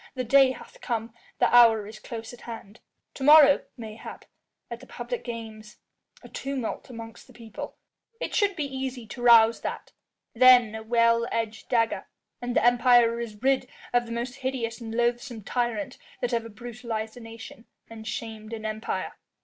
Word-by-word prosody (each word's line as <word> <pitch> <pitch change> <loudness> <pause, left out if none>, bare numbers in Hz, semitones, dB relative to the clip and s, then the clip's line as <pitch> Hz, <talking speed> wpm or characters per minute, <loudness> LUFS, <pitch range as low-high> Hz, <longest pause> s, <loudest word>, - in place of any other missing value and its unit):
The 255 - -2
day 270 +2 +5
hath - - -14
come, 225 -1 -3 0.2
the - - +3
hour 225 -3 +7
is 215 +1 -10
close 230 0 -8
at 245 - -13
hand. 225 -2 -9 0.3
To 270 - -7
morrow, 295 -1 +7
mayhap, 220 -2 -9 0.5
at - - -5
the - - -14
public - - -5
games... 220 -3 -8 0.5
a - - -10
tumult 270 -4 -5
amongst 230 0 -10
the 255 - -17
people... 225 -2 -9 0.4
it - - -4
should 405 -2 +2
be 300 - -2
easy 265 -3 -5
to 240 +3 -9
rouse 230 -1 +6
that... - - -5 0.4
then 245 -2 +6
a 220 - -5
well 230 +1 +2
edged 220 -1 -3
dagger... 230 -2 +1 0.3
and 245 0 -3
the - - +3
Empire 240 -1 +5
is 220 -1 -7
rid 270 0 +2 0.3
of 240 -1 +2
the - - -8
most 240 +3 -4
hideous 255 -3 -3
and 225 -1 -6
loathsome 240 -1 -1
tyrant 245 +5 -2 0.2
that 245 0 -2
ever 230 -1 -1
brutalised 225 -1 -6
a - - -10
nation 225 0 -11 0.2
and 220 -1 -10
shamed 220 -1 -6
an 220 -1 -6
empire." 215 +1 -3
235 Hz, 170 wpm, -26 LUFS, 225-250 Hz, 0.5 s, hour